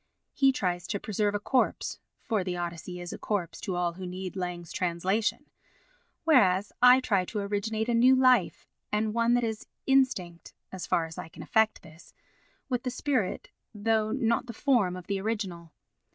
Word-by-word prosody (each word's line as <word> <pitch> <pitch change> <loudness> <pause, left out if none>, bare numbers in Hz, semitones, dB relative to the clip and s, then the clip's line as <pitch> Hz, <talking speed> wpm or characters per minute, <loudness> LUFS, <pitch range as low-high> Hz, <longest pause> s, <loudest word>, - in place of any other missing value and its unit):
He 270 -1 +4
tries 180 -8 -2
to 200 - -2
preserve 205 0 -1
a - - 0
corpse 255 +5 0 0.2
(for 220 -7 0
the 180 -1 -3
Odyssey 175 +1 -5
is 175 0 -6
a - - -8
corpse 190 -6 -3
to 185 - -3
all 175 -1 0
who 185 +1 -7
need 185 +1 -6
Lang's 180 -2 -4
translation), 185 +5 -1 0.8
whereas 205 - +4
I 250 +1 +8
try 200 -7 +1
to 215 - -6
originate 210 +2 -2
a 240 - +1
new 250 +3 +6
life 255 -1 +3 0.3
and 210 0 0
one 235 +1 +3
that 245 - +1
is 220 -1 -3 0.2
instinct 220 -11 +1 0.2
(as 190 -1 -6
far 165 - +1
as 160 0 -9
I 160 - -7
can 160 0 -10
effect 220 +5 +2
this) 160 +1 -16 0.5
with 250 -3 -1
the 255 - -2
spirit 250 -7 -2 0.2
though 215 +1 +1
not 235 -1 0
the 235 - -6
form 225 -8 +2
of 180 -1 -8
the 195 0 -2
original. 190 -6 -4
205 Hz, 180 wpm, -28 LUFS, 180-235 Hz, 0.8 s, I